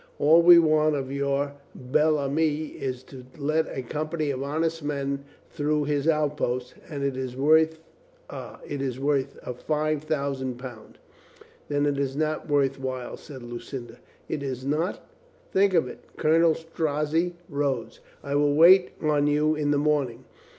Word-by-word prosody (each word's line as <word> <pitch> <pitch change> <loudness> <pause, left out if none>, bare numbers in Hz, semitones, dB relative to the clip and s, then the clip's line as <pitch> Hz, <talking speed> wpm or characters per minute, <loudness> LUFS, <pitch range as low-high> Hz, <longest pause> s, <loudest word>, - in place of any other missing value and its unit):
All 160 +3 +6
we 175 0 +9
want 155 -2 +4
of 135 -1 -3
your 140 0 -1 0.2
bel 150 +5 +2
ami, 150 +2 0
is 130 -1 -5
to 130 -1 -12
let 155 +2 0
a 130 - -5
company 155 +3 -2
of 130 -1 -4
honest 160 +3 -1
men 140 -1 -2 0.3
through 150 0 0
his 145 0 -1
outposts. 150 -5 0 0.2
And 140 -3 -4
it 140 -1 0
is 130 -1 -5
worth 160 +3 +4 0.3
— - - -32
ah - - -8
— - - -12
it 140 - -3
is 130 -2 -3
worth 140 -1 0
a 125 - -4
five 155 +3 -1
thousand 140 -4 -2
pound." 125 -4 -10 0.7
"Then 145 0 +1
it 145 -1 0
is 135 -1 -1
not 155 +1 -2
worth 140 -2 +2
while," 130 -2 -4
said 135 -5 -11
Lucinda. 120 +1 -8 0.3
"Is 135 -3 -4
it 135 - -3
not? 160 +6 -1 0.4
Think 195 -1 +3
of 160 -6 +3
it." - - -9 0.2
Colonel 160 +1 +4
Strozzi 160 +1 -1
rose. 140 -5 -2 0.2
"I 140 - -4
will 145 0 +3
wait 180 +4 +7
on 150 -1 +2
you 150 +1 +2
in 150 -1 -1
the 145 - +3
morning. 140 -5 0
145 Hz, 165 wpm, -26 LUFS, 135-155 Hz, 0.7 s, we